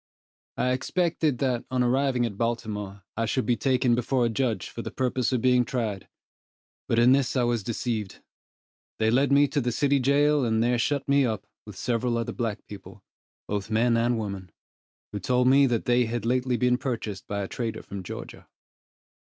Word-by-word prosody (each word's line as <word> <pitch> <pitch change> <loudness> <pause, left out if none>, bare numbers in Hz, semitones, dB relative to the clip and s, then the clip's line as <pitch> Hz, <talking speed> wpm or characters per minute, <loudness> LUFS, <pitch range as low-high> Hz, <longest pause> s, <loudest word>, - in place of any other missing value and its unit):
I 125 - +1
expected 160 +1 0
that, 125 -2 0
on 125 -1 +1
arriving 125 0 +1
at 110 -4 -4
Baltimore, 105 -3 -3
I 115 0 -1
should 130 +4 0
be 120 - +2
taken 125 +2 +2
before 125 +1 +1
a - - +1
judge 115 -1 -1
for 115 - -7
the - - -5
purpose 125 -1 -1
of 125 -3 0
being 125 -1 +4
tried, 110 -5 -3 0.8
but 115 - +1
in 120 +2 +6
this 135 -1 +2
I 125 - +2
was 120 -2 +1
deceived. 110 -1 -3 0.8
They 110 0 +2
led 135 +3 +2
me 145 +1 +5
to 145 - 0
the 120 0 -1
city 140 +3 +2
jail, 145 +2 +3
and 110 -1 +1
there 120 0 +1
shut 140 +3 0
me 140 0 +4
up, 110 -5 -2 0.2
with - - -9
several 120 0 0
other 115 - -3
black 115 -4 -3
people, 100 -1 -12 0.4
both 100 +1 -3
men 115 +2 +2
and 120 +1 +1
women, 100 -4 -5 0.6
who 105 - -4
told 125 +5 +1
me 135 +1 +6
that 120 -3 -1
they 120 0 +3
had 115 -1 -3
lately 125 +1 +1
been 125 0 +2
purchased 110 -6 -4
by 100 0 -2
a - - -4
trader 115 -1 -4
from 100 -2 -7
Georgia. 90 - -9
120 Hz, 190 wpm, -26 LUFS, 110-130 Hz, 0.8 s, in